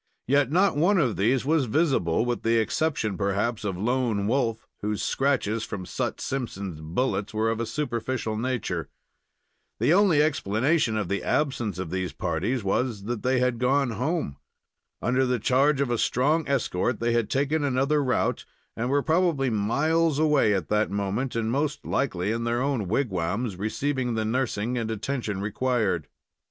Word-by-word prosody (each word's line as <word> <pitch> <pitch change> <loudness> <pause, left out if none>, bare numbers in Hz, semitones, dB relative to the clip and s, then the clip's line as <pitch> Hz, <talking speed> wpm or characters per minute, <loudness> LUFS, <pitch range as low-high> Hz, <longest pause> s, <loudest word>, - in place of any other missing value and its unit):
Yet 140 0 +2
not 185 +2 +3
one 180 +7 +3
of 130 -10 +2
these 120 +6 +1
was 155 -1 +2
visible, 120 - +1
with 120 -1 -1
the 115 +1 +2
exception, 110 - 0
perhaps, 105 +3 0
of 95 -4 -2
Lone 115 -1 0
Wolf, 115 -1 0 0.2
whose 105 0 -2
scratches 120 -5 0
from 95 -4 -5
Sut - - -3
Simpson's 100 - -4
bullets 100 +5 -2
were 110 +1 +1
of 115 - -3
a 115 - -2
superficial 120 -3 -2
nature. 110 -7 -2 0.9
The 160 - +3
only 190 -5 +4
explanation 130 -2 +1
of 105 -4 -1
the 100 +2 -1
absence 120 - 0
of 90 -3 -5
these 95 -1 -2
parties 100 +9 -1
was 105 +1 -1
that 115 0 -3
they 130 +1 +1
had 125 -2 +1
gone 135 0 +2
home. 125 - -2 0.7
Under 125 +2 +2
the 125 -1 +1
charge 135 +5 +2
of 135 -3 0
a 120 - 0
strong 150 +6 +1
escort 120 -4 0
they 115 0 +1
had 120 -3 +1
taken 145 +3 +1
another 140 +2 +1
route, 130 - 0 0.3
and 120 +2 -2
were 140 +1 +2
probably 160 -6 +2
miles 150 +9 +1
away 150 -9 +3
at 95 -5 -2
that 105 0 +2
moment, 100 +6 -2
and 115 -1 0
most 145 +3 -1
likely 105 -7 -1
in 115 +1 -2
their 120 +1 0
own 130 -6 -1
wigwams, 100 -1 -1
receiving 125 +5 -1
the 110 -1 -1
nursing 120 0 -1
and 115 -1 -3
attention 110 -3 -3
required. 105 - 0
120 Hz, 165 wpm, -26 LUFS, 105-140 Hz, 0.9 s, only